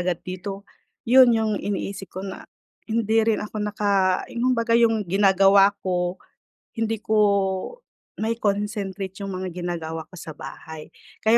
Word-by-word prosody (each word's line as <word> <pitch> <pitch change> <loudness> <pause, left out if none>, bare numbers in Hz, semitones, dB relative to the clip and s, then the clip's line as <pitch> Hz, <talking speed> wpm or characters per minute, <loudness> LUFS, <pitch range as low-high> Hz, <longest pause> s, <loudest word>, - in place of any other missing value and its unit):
agad 175 -1 -1
dito. 195 +2 -6 0.4
'Yon 250 0 +7
'yong 220 -1 +1
iniisip 200 -1 -4
ko 185 - -5
na 190 -1 -7 0.4
hindi 225 0 +1
rin 220 -2 +1
ako 210 +1 -7
naka 200 -3 +1
yung 250 +2 +1
baga 230 0 +2
'yong 225 -2 +3
ginagawa 195 0 +5
ko, 180 -1 -1 0.6
hindi 225 -1 -1
ko 215 +1 -1 1.0
mai-concentrate 205 -3 -2
'yong 195 - -4
mga 185 0 -4
ginagawa 165 -2 -4
ko 190 - -14
sa 160 - -8
bahay. 150 +3 -9 0.3
Kaya 225 +2 +5
200 Hz, 135 wpm, -24 LUFS, 185-220 Hz, 1.0 s, Yon